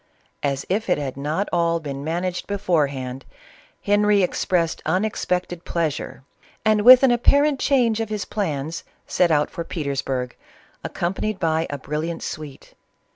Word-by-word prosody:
As 140 -1 -1
if 205 +2 -1
it 180 - +3
had 140 -3 -4
not 150 +8 -2
all 170 -1 +2
been 140 -3 -6
managed 175 +3 -3
beforehand, 140 -10 -1 0.6
Henry 205 -1 +3
expressed 175 -2 0
unexpected 180 -3 -1
pleasure, 155 -5 -3 0.4
and, 215 -1 +4
with 255 +4 +9
an 265 - +6
apparent 280 +4 +3
change 240 -6 +2
of 225 -1 -2
his 210 -2 -3
plans, 160 -5 -3 0.2
set 180 - +2
out 150 -2 +2
for 170 - -4
Petersburg, 135 -6 -3 0.5
accompanied 190 +3 -2
by 160 -2 0
a 145 - -4
brilliant 155 +4 -4
suite. 150 -3 -8
170 Hz, 135 wpm, -22 LUFS, 145-205 Hz, 0.6 s, with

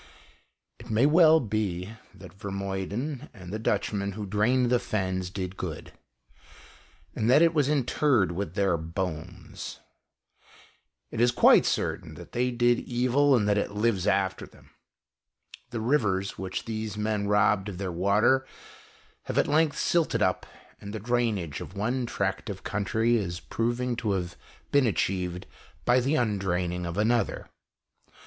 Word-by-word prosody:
It 120 0 -12
may 110 +4 +3
well 160 +1 +6
be 105 - -2 0.2
that 95 -2 -12
Vermuyden 100 +7 -4
and 95 -1 -9
the 110 - -3
Dutchmen 100 -2 -1
who 105 +1 -5
drained 120 +5 +2
the 125 - +4
fens 95 -4 -2
did 95 0 -5
good, - - -6 1.2
and 110 - 0
that 145 +6 +6
it 165 0 +4
was 145 -3 +2
interred 135 -7 +2
with 90 -1 -4
their 100 -4 +2
bones. 85 +1 -6 1.3
It 115 - -2
is 120 - +5
quite 120 - +5
certain - - -2
that - - -12
they 125 +1 0
did 120 0 +2
evil 130 +3 +2
and 105 -4 +1
that 105 0 +3
it 100 - -3
lives 105 -3 0
after 95 -1 0
them. - - -21 1.0
The 120 -2 -4
rivers, 105 -7 +1
which 95 -1 -5
these 110 -2 -4
men 105 -1 -1
robbed 105 -1 +2
of 95 - -7
their 95 -1 -3
water, 100 +9 +2 0.8
have - - -4
at - - +4
length 155 0 +2
silted 170 -2 +1
up, 95 - 0 0.3
and 100 +1 -8
the 110 - -4
drainage 110 -8 -1
of 95 - -9
one 120 +4 -1
tract 95 -4 -2
of 95 -2 -6
country 110 +4 +1
is 90 -4 -3
proving 120 +3 -2
to 110 -4 -1
have 90 -2 -3 0.4
been 140 -3 +4
achieved 90 -3 -1 0.4
by 125 +1 +4
the 135 +5 +1
undraining 90 - -1
of 85 +2 -5
another. 110 +1 0
105 Hz, 150 wpm, -27 LUFS, 95-120 Hz, 1.3 s, well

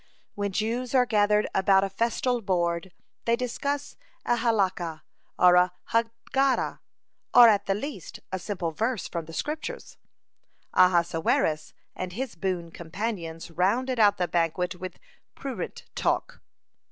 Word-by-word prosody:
When 205 -1 -2
Jews 230 +6 -1
are 250 -1 +5
gathered 210 -2 +3
about 195 0 +4
a 195 - -1
festal 235 +3 0
board, 175 -2 -1 0.3
they 235 - +3
discuss 275 +4 -3 0.3
a 240 - +2
Halakah, 190 -8 0 0.3
or 180 -1 +6
a 180 0 +4 0.2
Haggadah, 230 +4 0 0.6
or, 245 -1 +10
at 205 -2 +3
the 195 - +2
least, 210 - -6
a 190 - -2
simple 180 -3 -3
verse 225 +6 -1
from 170 -2 -4
the 165 - -11
Scriptures. 315 - -5 0.8
Ahasuerus 165 -3 +2 0.2
and 185 -1 -5
his 255 +4 -4
boon 170 -1 -3
companions 170 -2 -5
rounded 230 +9 +1
out 205 -2 +5
the 180 - 0
banquet 175 +2 0
with 185 0 -8 0.4
prurient 270 -2 -6
talk. - - -1
195 Hz, 130 wpm, -27 LUFS, 175-235 Hz, 0.8 s, or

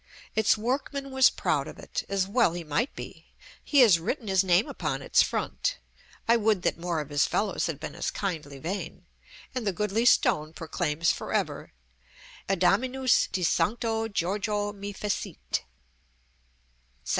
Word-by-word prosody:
Its 220 0 +3
workman 270 +4 -2
was 265 -1 +6
proud - - -1
of - - -9
it, - - -4
as 195 -1 0
well 225 -4 +3
he 175 0 -5
might 160 - -1
be: - - -9 0.4
he 285 -3 +4
has 205 -9 +7
written 220 - -3
his 190 -1 +3
name 185 +3 +3
upon - - -3
its - - +4
front - - -1 0.5
(I 235 +1 +5
would 215 -4 +1
that - - 0
more 170 -2 -1
of 150 - -8
his 145 0 +3
fellows 205 -3 0
had 155 -4 -4
been 145 - -6
as 170 - -2
kindly 155 -8 -4
vain), 175 +8 -5 0.5
and 250 -4 -3
the - - +3
goodly 210 +4 0
stone 155 -9 +3
proclaims 165 0 0
for - - -5
ever, - - -2 0.8
ADAMINUS 240 +8 +3
DE 185 - -1
SANCTO 225 +5 +1
GIORGIO 205 +2 -1
ME 200 0 -6
FECIT. 205 0 -3
200 Hz, 155 wpm, -27 LUFS, 170-230 Hz, 0.8 s, has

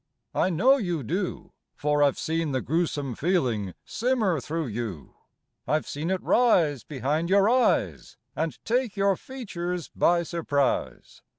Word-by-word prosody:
I - - +2
know 245 - +4
you 175 - -2
do, 180 - -3 0.2
for 150 0 +1
I've 140 -2 +3
seen 160 -2 -1
the 130 - 0
gruesome 150 -4 -1
feeling 120 - 0
simmer 225 - 0
through 160 +3 -3
you. 110 - -5 0.5
I've 155 +1 0
seen 155 +4 -3
it 190 -1 -1
rise 165 - +3
behind 150 +4 -2
your 200 +1 +5
eyes 250 +2 +1 0.2
And 160 -5 -2
take 235 -2 0
your 195 0 +3
features 180 - -5
by 170 0 +3
surprise. 155 -5 -2
165 Hz, 135 wpm, -26 LUFS, 145-195 Hz, 0.5 s, your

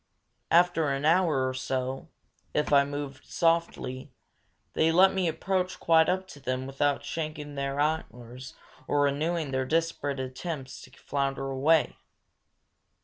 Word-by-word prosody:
After 170 -3 +4
an 140 +1 -1
hour 160 -6 +3
or 130 - -2
so, 130 0 -3 0.5
if 150 0 +1
I 140 0 +7
moved 145 -1 -6
softly, 165 -5 0 0.6
they 160 +1 +3
let 190 +3 +5
me 190 -2 0
approach 185 +2 -1
quite 160 -1 +4
up 185 +1 -1
to 145 - -11
them 130 -1 -3
without 140 +1 -1
shaking 155 -2 -5
their 140 0 -3
antlers 130 -5 -3 0.3
or 145 - +2
renewing 150 +2 0
their 130 0 0
desperate 155 -3 -1
attempts 130 +1 -5
to 130 - -14
flounder 135 0 -3
away. 150 +4 +2
145 Hz, 135 wpm, -28 LUFS, 135-165 Hz, 0.6 s, I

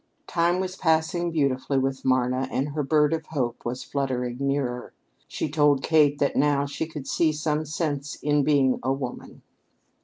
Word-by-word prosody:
Time 175 +1 +1
was 185 0 -3
passing 170 +1 +1
beautifully 140 -3 0
with 135 0 -1
Marna, 130 0 +1
and 135 +2 -1
her 150 +1 -2
Bird 150 +2 +2
of 160 -1 -3
Hope 125 -6 -3
was 125 +2 -4
fluttering 125 -3 -2
nearer. 135 -3 -2 0.3
She - - -3
told 145 -2 +2
Kate 150 -3 +4
that 140 - 0
now 140 -1 +2
she 140 +3 -4
could 150 -4 -8
see 160 -2 +2
some 155 0 -1
sense 150 -2 -3
in 145 -1 +1
being 135 -3 +3
a 130 - 0
woman. 135 -2 -6
145 Hz, 165 wpm, -25 LUFS, 135-155 Hz, 0.3 s, Kate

